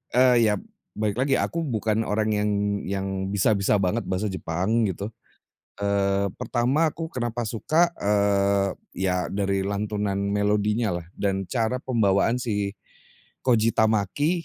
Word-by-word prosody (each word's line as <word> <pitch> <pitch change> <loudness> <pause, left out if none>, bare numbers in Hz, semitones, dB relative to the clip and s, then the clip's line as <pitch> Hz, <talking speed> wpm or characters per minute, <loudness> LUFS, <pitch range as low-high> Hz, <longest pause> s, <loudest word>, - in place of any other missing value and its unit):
eee, 125 -2 +5
ya - - +2 0.4
balik 105 -1 0
lagi, 135 0 +2
aku 170 - -1
bukan 110 -4 0
orang 110 +1 0
yang 105 0 +1 0.3
yang 95 0 -3 0.2
bisa 100 +2 +2
bisa 100 +1 +2
banget 100 +4 0
bahasa 95 +3 0
Jepang 95 +6 0
gitu. 100 +4 -5 0.7
Eee, 100 -1 +1
pertama 135 +7 +1
aku 160 0 -6
kenapa 120 -3 -3
suka, 155 +10 +2
eee, 100 -1 +2 0.2
ya 90 0 0
dari 100 -1 0
lantunan 100 0 -1
melodinyalah 105 -3 0
dan 95 -2 -1
cara 120 +1 0
pembawaan 115 -1 +2
si 105 -5 -2 0.7
Koji 115 -3 +3
Tamaki, 110 - +2
105 Hz, 130 wpm, -25 LUFS, 100-115 Hz, 0.7 s, eee